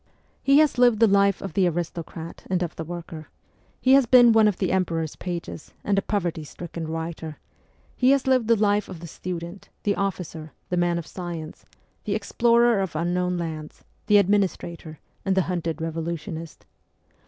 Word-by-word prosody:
He 275 +1 +4
has 300 -5 +4
lived 240 -3 +5
the 225 - +7
life 200 -1 +3
of 195 - -5
the 190 -3 +3
aristocrat 170 -1 -5
and 180 -1 +1
of 170 - -5
the 160 - -5
worker; 165 -2 -8 0.5
he 260 - +4
has 270 -3 +6
been 245 -1 +7
one 220 -1 +5
of 205 - 0
the 185 - 0
Emperor's 165 -4 -1
pages 175 -3 -6
and 205 - +1
a - - -2
poverty 175 -6 -2
stricken 165 +1 -7
writer; 160 -1 -5 0.6
he 255 - +3
has 275 -1 +3
lived 255 -4 +2
the 230 - +5
life 205 -1 +1
of 175 - -8
the 170 - -9
student, 175 +2 -7
the 205 - +2
officer, 170 -5 -4 0.2
the 180 - 0
man 175 -1 +1
of 170 - -4
science, 170 -4 -7 0.4
the 205 - 0
explorer 235 +1 +3
of 190 -4 -3
unknown 180 +2 0
lands, 160 -3 -6 0.2
the 210 - +6
administrator, 180 -5 0 0.3
and 195 -1 +1
the 190 - +4
hunted 170 -3 -3
revolutionist. 165 0 -5
180 Hz, 175 wpm, -24 LUFS, 165-205 Hz, 0.6 s, the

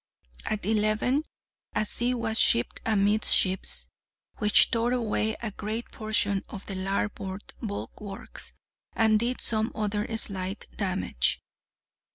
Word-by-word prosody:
At 215 -3 -2
eleven, 215 +7 +1 0.5
a - - +2
sea 245 +4 +1
was 225 -2 +1
shipped 120 - +3
amidships, 195 - +3 0.5
which 210 -1 +5
tore 235 +1 +1
away 220 -2 0
a 220 - -2
great 215 +4 -5
portion 210 -3 0
of 200 -2 -8
the 195 - -5
larboard 195 +1 -3
bulwarks, 205 -2 -7 0.4
and 220 -1 +4
did 240 +3 -1
some 220 0 0
other 210 -1 -1
slight 195 -1 -1
damage. 185 - 0
215 Hz, 115 wpm, -27 LUFS, 195-220 Hz, 0.5 s, which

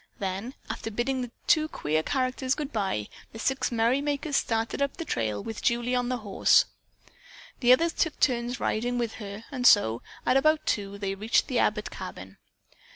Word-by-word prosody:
Then, 195 +6 -4
after - - -4
bidding 250 +4 -1
the 245 - -4 0.2
two 315 -3 +4
queer 155 - -1
characters 255 - 0
goodbye, 210 - -2 0.3
the - - -8
six 265 +4 0
merrymakers 280 +6 0
started 225 +3 0
up 280 0 -1
the 330 - -5
trail 110 - -2
with 225 - -6
Julie 240 +1 +1
again 250 0 +2
on 245 0 -2
the 255 - 0
horse. 210 -4 +4 0.9
The 245 -1 +4
other 255 +6 +6
girls 335 - 0
took 320 - -1
turns 245 -1 +1
riding 245 +3 -1
with 235 -2 -1
her 205 +2 -7
and 250 -3 +2
so, 115 - +5 0.2
at 260 - +4
about 310 +3 +3
two, 200 -1 -1
they 200 -1 -2
reached 215 +4 +1
the 255 -4 0
Abbott 210 0 0
cabin. 95 - -9
240 Hz, 180 wpm, -27 LUFS, 205-265 Hz, 0.9 s, other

